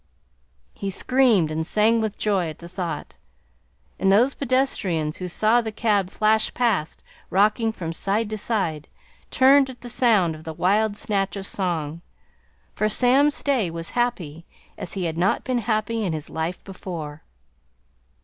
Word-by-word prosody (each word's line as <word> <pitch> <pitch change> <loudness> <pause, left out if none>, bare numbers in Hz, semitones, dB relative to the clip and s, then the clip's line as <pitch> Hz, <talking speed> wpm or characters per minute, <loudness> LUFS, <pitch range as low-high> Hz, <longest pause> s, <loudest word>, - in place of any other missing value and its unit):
He 200 - -4
screamed 220 -6 +2
and 155 +1 -2
sang 225 +2 +3
with 215 -1 -3
joy 195 -6 0
at 155 - -8
the 170 - -11
thought, 175 -2 -5 0.8
and 195 - +3
those 240 +7 +4
pedestrians 195 - 0
who 180 - -5
saw 220 +6 +2
the 225 -1 -4
cab 205 -4 +1
flash 215 +2 +2
past, 225 -10 0 0.3
rocking 215 +3 +2
from 165 -6 -5
side 205 +6 -1
to 215 - -2
side, 175 -9 -2 0.4
turned 270 +1 +5
at 255 - -11
the 245 - -8
sound 215 -9 +3
of 155 0 -11
the 160 -1 -6
wild 205 +5 +1
snatch 200 -2 -1
of 195 -1 -5
song, 170 -5 -3 0.7
for 215 - 0
Sam 260 +6 +4
Stay 270 -9 0
was 165 0 -5
happy 180 -10 -2 0.3
as - - -6
he 190 - -3
had 165 0 -3
not 185 +2 +1
been 255 -2 0
happy 220 0 -1
in 180 -5 -1
his 155 -2 -6
life 160 +3 -3
before. 165 -6 -7
200 Hz, 160 wpm, -23 LUFS, 170-230 Hz, 0.8 s, turned